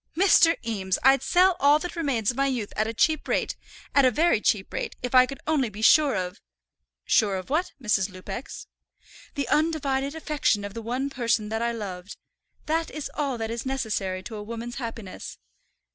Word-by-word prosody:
"Mr. 345 -3 +5
Eames, 190 -5 -1
I'd 270 +1 +5
sell 365 +1 +4
all 285 +1 +5
that 355 +3 -6
remains 265 -10 0
of 240 - -12
my 275 0 +2
youth 245 -6 -3
at 215 +1 0
a - - -2
cheap 305 +7 +1
rate, - - 0 0.4
at 280 - +5
a 255 - +6
very 300 -2 +2
cheap 200 -3 0
rate, - - -4
if 250 - -3
I 255 0 +7
could 275 - -7
only 295 -6 +1
be 210 +1 -8
sure 295 +1 +5
of 180 -1 -4 0.3
" - - -65 0.3
"Sure 205 -3 +3
of 185 +7 -6
what, 335 +5 0
Mrs. 210 -5 +1
Lupex?" 195 +6 -8 0.7
"The 280 - -2
undivided 290 -2 0
affection 295 -10 0
of 200 - -7
the 230 - -6
one 255 +5 -3
person 230 -4 0
that 220 +1 -2
I 235 0 0
loved. 195 -4 -7 0.5
That 325 +1 0
is 300 -1 -6
all 280 -4 -2
that 225 0 -3
is 230 0 -4
necessary 215 -8 -2
to 220 +1 -7
a - - -6
woman's 230 +2 -6
happiness." 230 -6 -7
245 Hz, 195 wpm, -25 LUFS, 215-285 Hz, 0.7 s, I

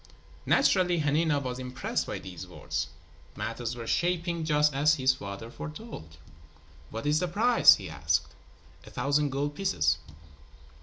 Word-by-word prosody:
Naturally, 180 -3 +3
Hanina 150 0 +2
was 130 -2 -4
impressed 125 -1 -3
by - - -3
these 90 -1 -9
words. 80 -4 -4 0.5
Matters 115 +1 -4
were 115 -1 -7
shaping 170 +3 0
just 150 -2 +3
as 150 +3 +4
his 130 -2 +3
father 100 -1 -8
foretold. 150 - -9 0.7
"What 115 +4 -6
is 150 +1 +3
the 180 - 0
price?" 235 +6 +6
he - - -8
asked. 80 0 -1 0.5
"A - - -12
thousand 140 +3 +1
gold 140 +2 -2
pieces." 110 - +1
140 Hz, 140 wpm, -28 LUFS, 115-160 Hz, 0.7 s, price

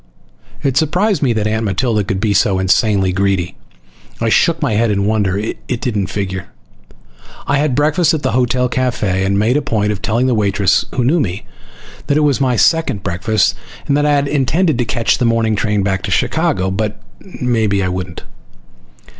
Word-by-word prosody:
It 135 -1 0
surprised 180 +4 +1
me 135 -4 +2
that 110 -2 -1
Aunt 110 +1 -1
Matilda 105 +2 0
could 95 -1 -3
be 105 0 +1
so 100 -1 +2
insanely 95 +1 +2
greedy. 95 -2 -1 0.6
I 115 - 0
shook 165 +7 +2
my 145 -8 0
head 115 +2 +2
in 100 -1 0
wonder. 100 -3 0
It 115 +3 -4
didn't 105 -7 -2
figure. 95 -2 -4 1.0
I 145 - +1
had 145 -4 0
breakfast 155 +4 +2
at 150 - -5
the 130 - 0
hotel 125 +1 +1
cafe 120 -7 -1
and 100 +1 +1
made 115 +6 +2
a - - 0
point 105 -5 -1
of 100 -2 -4
telling 120 +4 0
the 130 - +2
waitress, 100 -2 +1
who 125 - +1
knew 150 +8 +2
me, 95 - -3 0.6
that 145 - +2
it - - +2
was 145 -3 +1
my 130 -2 +2
second 115 - +1
breakfast, 100 +4 +1 0.3
and 140 - +2
that 145 0 +2
I 150 - +3
had 140 0 +1
intended 150 +4 +1
to 120 - +1
catch 115 +3 0
the 125 - +1
morning 115 -1 +1
train 105 0 0
back 95 -1 -1
to - - -5
Chicago, 95 +1 0
but 105 +2 -3 0.4
maybe 110 -6 +1
I - - 0
wouldn't. 90 -2 -5
110 Hz, 190 wpm, -16 LUFS, 100-130 Hz, 1.0 s, I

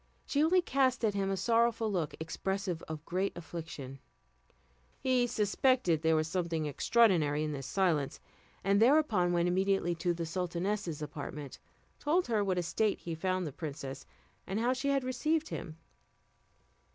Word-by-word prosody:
She 290 +1 +1
only 355 +3 +4
cast 260 -5 +2
at 210 - +1
him 195 -1 0
a 195 - -1
sorrowful 230 +1 +2
look, 170 -6 -1
expressive 180 +2 -3
of 160 0 -6
great 185 +2 -1
affliction. 160 -6 -7 1.0
He 255 -2 +2
suspected 210 - +2
there 160 0 +3
was 155 0 +1
something 165 -2 -1
extraordinary 155 - +3
in 155 - -2
this 135 -2 -5
silence, 160 -5 +1 0.4
and 200 +2 +3
thereupon 230 - +4
went 175 0 +2
immediately 190 -1 +1
to 175 +1 -1
the 170 -1 -3
sultaness's 175 -1 -2
apartment, 145 -1 -7 0.4
told 340 +5 +2
her 225 -3 +1
in 200 - 0
what 185 -1 +1
a 180 - +1
state 205 +5 +1
he 170 - -4
found 185 +2 -1
the 150 - -4
princess, 140 -4 -6 0.4
and 195 +3 -1
how 245 +3 +2
she 260 +2 -3
had 275 -1 +2
received 305 +5 0
him. 160 -4 -6
185 Hz, 160 wpm, -32 LUFS, 160-230 Hz, 1.0 s, only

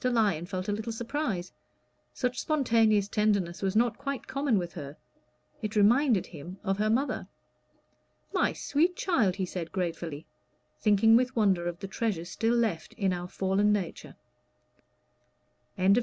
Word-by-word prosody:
Lyon 215 -9 +1
felt 185 0 -4
a - - 0
little 220 +3 -3
surprise; 225 - -3 0.6
such 250 -1 -2
spontaneous 225 -8 +3
tenderness 205 -5 0
was 195 0 -1
not 235 0 +2
quite 275 -2 -4
common 275 -5 0
with 175 -2 -3
her; 145 -3 -8 0.6
it 215 -1 -4
reminded 225 +1 +4
him 170 +3 -9
of 195 -1 -1
her 215 +1 +2
mother. 260 +6 0 1.1
"My - - +2
sweet 335 +5 +1
child," 235 - +1
he 190 - -1
said 175 -2 -5
gratefully, 165 -4 -3 0.5
thinking 215 +1 +5
with 255 +2 +2
wonder 190 -6 +2
of 175 -1 -3
the 195 - -4
treasures 190 -4 -2
still 230 +1 +1
left 215 -9 -1
in 195 -4 0
our 175 0 -4
fallen 195 +3 +1
nature. 195 -5 -3 1.6
CHAPTER 190 +1 +4
XI. 230 - +5
205 Hz, 150 wpm, -29 LUFS, 180-235 Hz, 1.6 s, thinking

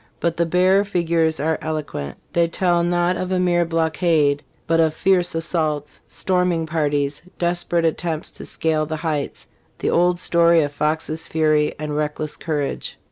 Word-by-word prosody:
f - - -33
"But 170 0 -1
the 170 0 +1
bare 185 +3 +4
figures 170 -5 +1
are 160 +2 0
eloquent; 145 - -4 0.2
they 170 -1 +3
tell 175 0 +1
not 175 +1 +1
of 185 0 -3
a 185 - +1
mere 175 -1 +2
blockade, 160 -3 +1 0.2
but 165 0 +2
of 160 -1 +3
fierce 180 -2 +2
assaults, 155 -3 -2
storming 180 -3 0
parties, 145 -2 -1 0.2
desperate 175 -1 0
attempts 160 0 -2
to - - -10
scale 155 -1 0
the 160 - -3
heights 150 -3 -2 0.3
the - - -1
old 175 +1 +3
story 170 -2 +4
of 145 - -2
Foxes' 155 +2 -2
fury 155 -1 +2
and 150 -1 -4
reckless 150 0 -2
courage." 150 -4 -3
165 Hz, 160 wpm, -21 LUFS, 155-175 Hz, 0.3 s, bare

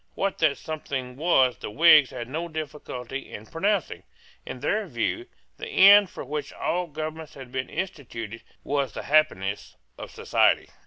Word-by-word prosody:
What 195 -1 -2
that 155 -3 +2
something 135 -5 -5
was 135 -5 +2
the - - -6
Whigs 150 +2 +6
had 120 - -7
no 160 +6 -4
difficulty 140 -5 -7
in 105 - -8
pronouncing. 190 - -1 0.5
In 125 - -6
their 205 +8 0
view, 165 - -2 0.3
the 455 - -7
end 205 - +7
for - - -8
which 150 +2 -4
all 180 0 -2
governments 155 0 -7
had 130 -3 -11
been 130 0 -3
instituted 115 - -6 0.2
was 140 -4 -1
the - - -6
happiness 100 -10 +1 0.2
of - - -7
society. - - +1
150 Hz, 155 wpm, -25 LUFS, 130-170 Hz, 0.5 s, end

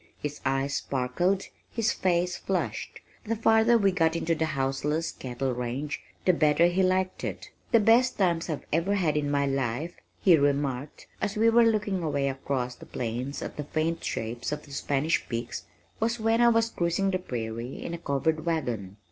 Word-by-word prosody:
His 150 0 -5
eyes 135 +1 0
sparkled, 155 +10 0 0.3
his 230 -1 +1
face 180 -1 +1
flushed. 190 -2 -3 0.2
The 230 -1 -1
farther 225 +1 +4
we 200 -3 +3
got 165 -3 +2
into 165 0 +1
the 160 0 0
houseless 140 +4 0
cattle 130 +1 -3
range, 125 +4 -3 0.2
the 185 - +5
better 155 0 +4
he 175 +2 +2
liked 185 0 +1
it. - - -5 0.2
"The 230 - +6
best 235 +4 +4
times 175 -3 +1
I've 155 - -3
ever 175 +6 +2
had 170 -7 +1
in 145 -1 0
my 140 0 +2
life," 135 +4 -1 0.3
he 180 -4 +6
remarked 140 -1 -1 0.2
as 205 - -1
we 225 +1 +5
were 230 0 +6
looking 205 -4 0
away 140 -4 0
across 130 -2 -2
the - - -14
plain 120 +3 -3
at - - -7
the 150 - -2
faint 160 +3 -1
shapes 115 +4 -3
of 150 0 -4
the 145 - -15
Spanish 140 +3 0
Peaks, 115 0 -4 0.3
"was 230 +2 0
when 225 +1 +2
I 240 - +7
was 230 0 +2
cruising 175 +3 0
the 185 - 0
prairie 120 -4 -5
in 170 - -4
a 170 - -4
covered 155 +1 0
wagon." 120 - -2
160 Hz, 180 wpm, -27 LUFS, 135-190 Hz, 0.3 s, I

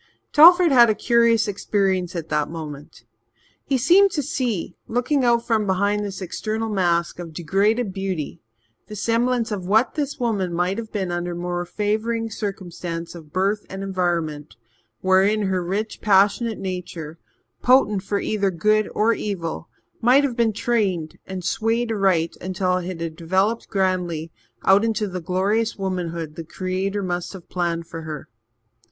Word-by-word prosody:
Telford 345 +2 +8
had 240 -3 +7
a 215 - +2
curious 235 -2 +3
experience 190 -3 0
at 165 -2 -5
that 150 -1 0
moment. 150 -5 -8 0.6
He 270 - +1
seemed 360 +10 +5
to 295 - -1
see, 245 - -2
looking 250 +4 +1
out 235 -1 +3
from 220 -3 +1
behind 200 +2 +1
this 195 -1 -5
external 220 +5 -3
mask 175 -4 0
of 170 -2 -7
degraded 195 +6 +1
beauty, 185 -5 -4 0.5
the 210 - -8
semblance 230 +2 0
of 190 -4 -4
what 220 +5 +3
this 290 -1 -3
woman 200 -8 -1
might 180 +4 0
have 225 -1 -7
been 190 -4 -2
under 175 0 -3
more 175 0 -3
favouring 220 +3 -1
circumstance 175 -5 -5
of 160 -4 -12
birth 200 +4 0
and 190 +1 -6
environment, 170 -6 -2 0.5
wherein 195 +3 +3
her 190 -2 0
rich, 200 +5 -3
passionate 205 +2 +3
nature, 170 -4 -6 0.4
potent 245 -6 +4
for 200 +1 -2
either 200 -2 0
good 215 +4 +1
or 225 +2 +3
evil, 170 -7 -4 0.3
might 255 +5 +5
have 265 -4 -1
been 230 -2 +2
trained 200 -8 -1
and 190 -1 -5
swayed 225 +1 0
aright 190 -6 +1
until 185 0 0
it 180 - -4 0.2
had 165 -1 -4
developed 190 +7 0
grandly 180 -5 -1 0.3
out 195 +2 +5
into 220 -2 0
the 185 -1 -5
glorious 200 +7 0
womanhood 170 -5 -3
the 165 - -7
Creator 190 +4 -3
must 175 0 -3
have 185 -3 -11
planned 170 -2 -2
for 165 0 -8
her. 155 -3 -7
195 Hz, 155 wpm, -22 LUFS, 175-225 Hz, 0.6 s, Telford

